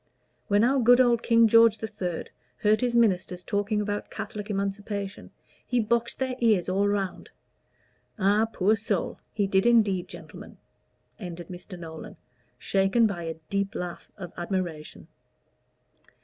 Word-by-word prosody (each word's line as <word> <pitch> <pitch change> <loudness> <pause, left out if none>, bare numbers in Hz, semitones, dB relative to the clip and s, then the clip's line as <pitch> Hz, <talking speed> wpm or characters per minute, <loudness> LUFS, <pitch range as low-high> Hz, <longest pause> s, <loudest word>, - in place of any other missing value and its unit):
When 205 +1 +3
our 265 +3 +3
good 245 +1 +6
old 240 -2 +4
King 230 -1 +5
George 230 0 +6
III. 195 -6 -4 0.4
heard 215 +2 +3
his 245 -1 0
ministers 185 -5 +1
talking 205 +1 -1
about 205 0 -3
Catholic 210 0 -6
Emancipation, 200 0 -4 0.3
he 245 - 0
boxed 235 +1 0
their 260 -1 -1
ears 215 -7 +3
all 195 +2 +1
round. 200 -2 -2 0.9
Ah, 205 +2 +3
poor 210 +1 +2
soul! 210 -3 -2
he 205 - 0
did 195 +2 +2
indeed, 210 -6 +3
gentlemen," - - -11 0.6
ended 175 -4 -8
Mr. 180 +1 -9
Nolan, 170 +5 -9 0.4
shaken 195 - +2
by 185 -6 -2
a 165 0 -4 0.2
deep 200 0 -1
laugh 180 -1 -6
of 180 -4 -8
admiration. 175 -4 -4
205 Hz, 135 wpm, -26 LUFS, 185-225 Hz, 0.9 s, good